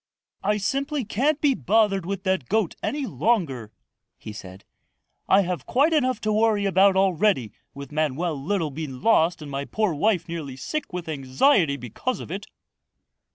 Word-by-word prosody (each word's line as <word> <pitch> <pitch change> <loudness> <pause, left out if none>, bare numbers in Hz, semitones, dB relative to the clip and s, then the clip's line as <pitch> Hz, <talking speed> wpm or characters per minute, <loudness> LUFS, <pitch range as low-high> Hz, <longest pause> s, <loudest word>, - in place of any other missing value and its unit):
"I 210 +2 +1
simply 275 +6 -1
can't 275 +9 +1
be 290 -2 +3
bothered 205 -6 +1
with 195 -1 -3
that 190 -9 -1
goat 215 -4 +1
any 290 -1 -2
longer," 160 - -1 0.5
he 105 - -9
said. 95 -1 -11 0.6
"I 195 - +6
have 180 -6 -4
quite 290 +6 +3
enough 255 -6 +1
to 215 0 0
worry 215 -1 +2
about 195 0 +4
already 190 - +2 0.2
with 140 +1 -9
Manoel 155 +2 -1
Littlebean 155 -7 -3
lost 170 -7 +3
and 145 - -8
my 140 0 -3
poor 215 0 0
wife 180 +2 +1
nearly 160 -6 -5
sick 300 - -4
with 180 -2 -5
anxiety 145 - +2
because 125 - -4
of - - -8
it." 195 +3 -5
190 Hz, 155 wpm, -24 LUFS, 150-220 Hz, 0.6 s, I